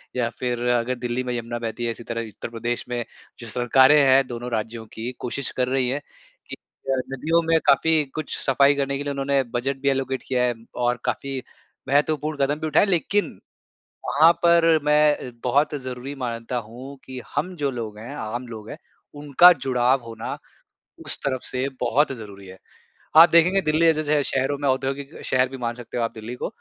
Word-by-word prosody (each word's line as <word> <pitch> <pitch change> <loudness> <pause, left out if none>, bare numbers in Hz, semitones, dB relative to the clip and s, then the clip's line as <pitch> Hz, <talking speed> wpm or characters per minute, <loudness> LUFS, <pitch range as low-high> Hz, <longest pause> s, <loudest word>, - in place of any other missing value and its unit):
या 120 -2 0
फिर 125 -1 -1
अगर 120 +1 +1
दिल्ली 120 +1 -3
में 125 -1 -3
यमुना 120 0 -4
बहती 115 +1 -4
है, 115 - 0
इसी 115 - -9
तरह 115 0 -4
उत्तर 105 +2 -8
प्रदेश 120 +1 -3
में 120 -1 -2 0.4
जो 120 - -8
सरकारें 130 +5 +4
हैं, 135 0 +5
दोनों 120 0 -6
राज्यों 110 0 -3
की 115 +3 -5
कोशिश 130 +2 -3
कर 125 -1 +1
रही 130 -1 +1
हैं, 140 - -1 0.5
कि - - -5 0.4
अ, 135 - +1 0.2
नदियों 165 +5 +1
में 165 0 +4
काफ़ी 155 +2 +4
कुछ 155 -2 -3
सफाई 140 +1 +3
करने 140 -1 -1
के 145 - -4
लिए 145 - -3
उन्होंने 140 0 +1
बजट 135 +3 -1
भी 140 - +2
एलोकेट 135 -1 -1
किया 125 -1 +1
है। 125 -1 +1 0.2
और 120 0 0
काफ़ी 135 -1 -2 0.5
महत्वपूर्ण 150 +2 +1
कदम 145 +2 -2
भी 160 - -2
उठाए, 155 - +4
लेकिन, 200 +2 0 0.7
वहाँ 160 +4 +6
पर 170 -1 +5
मैं 150 -3 +2
बहुत 145 +5 +2
ज़रूरी 130 0 -6
मानता 120 -2 -4
हूँ 130 +5 -10
कि, 130 -1 -8
हम 175 +6 -2
जो 145 -3 -1
लोग 110 -4 -6
हैं, 120 +6 -8
आम 120 0 -5
लोग 110 -2 -9
है - - -8 0.4
उनका 145 +5 +6
जुड़ाव 130 -3 +1
होना, 115 0 -6 0.7
उस - - -4
तरफ 130 -2 -1
से 130 +1 -2
बहुत 135 +5 +2
ज़रूरी 100 -6 -9
है। 95 0 -11 0.6
आप 165 +2 +10
देखेंगे 170 +4 +4
दिल्ली 155 0 +2
जे 165 - +6
जैसे 155 -1 -2
शह 150 - +3
शहरों 135 +2 0
में 145 0 -2
औद्योगिक 135 +2 -2
शहर 130 0 +2
भी 135 - -7
मान 120 -2 -3
सकते 120 0 -8
हो 120 - 0
आप 115 - -1
दिल्ली 110 +2 -7
को - - -4
130 Hz, 195 wpm, -23 LUFS, 120-145 Hz, 0.7 s, आप